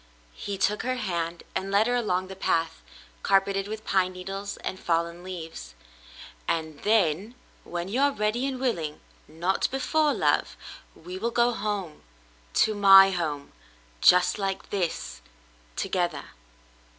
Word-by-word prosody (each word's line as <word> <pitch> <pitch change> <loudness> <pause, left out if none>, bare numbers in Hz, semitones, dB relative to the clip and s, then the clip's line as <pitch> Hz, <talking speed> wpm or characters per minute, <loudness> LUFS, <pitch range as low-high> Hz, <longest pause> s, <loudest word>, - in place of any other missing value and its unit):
He 200 - -5
took 210 +2 +1
her 255 0 -1
hand 170 -7 -3
and 195 - -2
led 200 +2 +3
her 245 - 0
along 185 -6 0
the 190 - -8
path, 165 - -1 0.4
carpeted 195 0 +2
with 220 +1 -6
pine 185 -1 +1
needles 195 +2 -6
and 185 - -4
fallen 170 0 -1
leaves. 165 - -8 0.4
" - - -15
And 160 -3 -2
then, 205 +1 +1 0.3
when 175 +1 -4
you 235 +7 -1
are 285 0 +4
ready 235 +2 -1
and 265 -2 -4
willing 170 - -2 0.2
— - - -31
not 170 +5 -1
before, 300 +3 +1
love - - +1 0.2
— - - -25
we 180 +3 -8
will 230 +4 0
go 235 +1 +2
home 200 -7 -4 0.3
— - - -31
to 220 - -1
my 195 -1 +8
home 155 -6 -3 0.3
— - - -31
just 180 +3 +1
like 195 -1 -3
this, 180 - -3 0.5
together." 175 -5 -1
190 Hz, 155 wpm, -26 LUFS, 170-210 Hz, 0.5 s, my